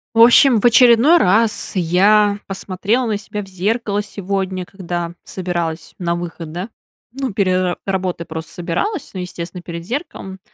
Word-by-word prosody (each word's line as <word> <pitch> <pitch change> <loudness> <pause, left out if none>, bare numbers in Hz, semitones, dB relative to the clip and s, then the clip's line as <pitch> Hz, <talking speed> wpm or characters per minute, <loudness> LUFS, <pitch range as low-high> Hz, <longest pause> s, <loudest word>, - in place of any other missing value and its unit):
В - - +2
общем, 240 0 +7
в - - -2
очередной 240 +6 +6
раз 220 - +2
я 200 +4 +3
посмотрела 200 +5 -1
на 215 -3 -1
себя 210 +1 -6
в 195 - -10
зеркало 205 +2 -1
сегодня, 190 -2 -3
когда 175 -3 -5
собиралась 175 -3 -4
на 170 -1 -1
выход, 170 -2 -6
да. 180 +6 -5 0.4
Ну, 265 -1 -3
пере 185 -2 +1
работой 185 -3 -2
просто 160 0 -7
собиралась. 215 - -3
Ну, 185 - -4
естественно, 180 0 -7
перед 170 -1 -7
зеркалом. 215 - -6
190 Hz, 150 wpm, -18 LUFS, 175-215 Hz, 0.4 s, общем